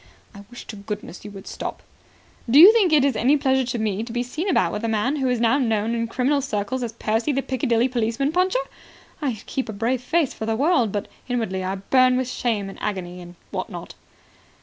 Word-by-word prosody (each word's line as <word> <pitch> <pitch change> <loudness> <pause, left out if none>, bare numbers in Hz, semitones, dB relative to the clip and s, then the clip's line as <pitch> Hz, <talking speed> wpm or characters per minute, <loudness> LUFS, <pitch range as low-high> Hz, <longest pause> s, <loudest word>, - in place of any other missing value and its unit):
"I 200 0 -12
wish 245 - -10
to 215 - -8
goodness 200 -2 -7
you 210 - -8
would 195 -2 -11
stop." - - -6 0.7
"Do 255 - +5
you 385 +7 +11
think 410 -7 +3
it 295 -3 +5
is 275 -4 +1
any 260 +7 +3
pleasure 265 -2 +2
to 245 - -2
me 215 -2 -1
to 230 +1 -6
be 240 +1 -1
seen 310 +10 -3
about 180 - +2
with 210 - -4
a - - 0
man 225 +7 0
who 265 -2 0
is 250 -2 0
now 235 +4 +3
known 225 -3 0
in 230 0 -1
criminal 260 +5 +1
circles 255 0 -2
as 235 -2 -4
Percy, 225 +4 0
the 275 0 -1
Piccadilly 245 -2 +1
Policeman 245 +3 -1
Puncher? 370 +6 +2 0.6
I 250 -8 -2
keep 260 -3 -3
a - - -4
brave 230 +5 -1
face 305 +2 +1
before 220 - -6
the 225 - +1
world, 270 - +2
but 205 0 -3 0.2
inwardly 225 -7 -2
I 190 +1 -2
burn 255 +6 +3
with 255 -1 -2
shame 225 -6 -1
and 195 - -10
agony 180 -3 -4
and 175 0 -12 0.2
what - - -4
not." - - -8
240 Hz, 225 wpm, -23 LUFS, 215-265 Hz, 0.7 s, you